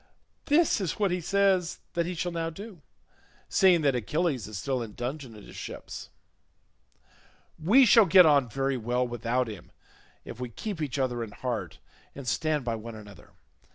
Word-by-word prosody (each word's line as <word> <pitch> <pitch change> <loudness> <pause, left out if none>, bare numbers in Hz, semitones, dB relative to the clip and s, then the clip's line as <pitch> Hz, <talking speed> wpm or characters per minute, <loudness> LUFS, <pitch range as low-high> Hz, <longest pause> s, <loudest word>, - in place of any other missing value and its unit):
This 300 -6 +3
is 185 - -1
what 200 -3 +1
he 180 0 -1
says 190 -1 +2 0.2
that 170 -1 0
he 180 - -4
shall 175 +1 -2
now 165 -1 -2
do, 195 +1 -10 0.7
seeing 180 -3 +4
that 140 -2 +3
Achilles 135 - -1
is 105 -2 -7
still 130 +4 -2
in 110 -3 -7
dudgeon 125 -1 -5
at 105 - -12
his - - -13
ship; - - -8 1.7
we 245 +11 +6
shall 225 -2 +6
get 180 +1 +8
on 140 -5 +4
very 135 +2 -1
well 125 +2 -1
without 120 +1 -1
him 105 -5 -9 0.5
if 115 - -9
we 125 -1 -4
keep 185 - -6
each 145 -3 -2
other 125 -3 -1
in 115 - -7
heart 110 -4 -4 0.4
and 135 -2 -8
stand 150 +1 0
by 115 - -1
one 115 0 -7
another. 105 -4 -13
140 Hz, 175 wpm, -28 LUFS, 120-175 Hz, 1.7 s, get